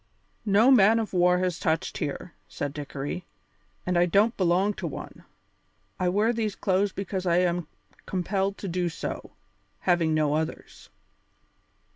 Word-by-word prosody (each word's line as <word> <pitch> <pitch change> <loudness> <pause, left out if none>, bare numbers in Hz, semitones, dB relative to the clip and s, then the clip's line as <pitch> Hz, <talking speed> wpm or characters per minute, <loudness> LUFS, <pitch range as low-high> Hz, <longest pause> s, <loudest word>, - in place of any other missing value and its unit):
"No 215 +6 +5
man 220 -3 +6
of 220 -3 -2
war 180 0 +4
has 180 -2 -1
touched 160 0 -1
here," 150 +3 -4
said 145 -1 -4
Dickory, 145 +4 -5 0.6
"and 180 -1 +1
I 175 - +4
don't 205 +7 +3
belong 185 +3 +2
to - - -2
one. - - -8 0.7
I 180 -1 +2
wear 210 +5 +2
these 220 -3 -2
clothes 195 +1 +1
because 190 -1 -4
I 170 0 +3
am 175 -2 +1 0.4
compelled 195 +2 -1
to 200 - -6
do 175 0 -1
so, 160 - -6 0.5
having 170 -3 +2
no 150 -1 +2
others. 155 -9 -4
180 Hz, 145 wpm, -26 LUFS, 170-200 Hz, 0.7 s, man